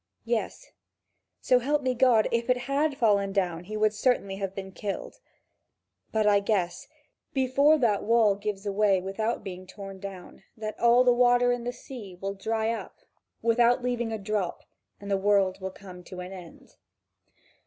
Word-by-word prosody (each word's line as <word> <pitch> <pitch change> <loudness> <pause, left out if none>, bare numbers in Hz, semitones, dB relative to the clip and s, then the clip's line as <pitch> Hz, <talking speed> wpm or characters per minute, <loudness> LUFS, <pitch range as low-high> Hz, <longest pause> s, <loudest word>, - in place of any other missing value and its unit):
Yes, 235 - -3 0.7
so 250 - +4
help 285 +3 0
me 255 -1 +1
God, 240 -3 +4
if 235 +1 -1
it 250 - +4
had 275 +3 0
fallen 200 -4 +2
down, 180 -3 -1
he 215 +3 -5
would 215 0 +2
certainly 210 -4 0
have 195 -1 -4
been 190 -1 -6
killed. 205 - -6 0.9
But 220 -1 +1
I 205 -1 +5
guess, 200 -4 -1 0.5
before 275 +4 +4
that 225 -7 +2
wall 225 -2 +4
gives 205 0 -5
away 200 -1 +2
without 205 +5 -3
being 185 -1 -8
torn 195 0 -9
down, 195 -2 -9 0.2
that 215 -1 -6
all 240 +1 +5
the 250 -1 +5
water 245 0 +4
in 245 -1 -2
the 245 - -1
sea 215 -8 -10
will 195 +1 -3
dry 220 +3 -1
up 230 - -6 0.5
without 240 +2 +3
leaving 240 -2 -1
a 220 - -2
drop 200 -3 -3 0.4
and 200 0 -7
the 195 - +3
world 195 -1 +2
will 190 - -3
come 185 -2 -12
to 185 - -9
an 180 +1 -7
end. 180 -3 -13
215 Hz, 170 wpm, -27 LUFS, 195-245 Hz, 0.9 s, I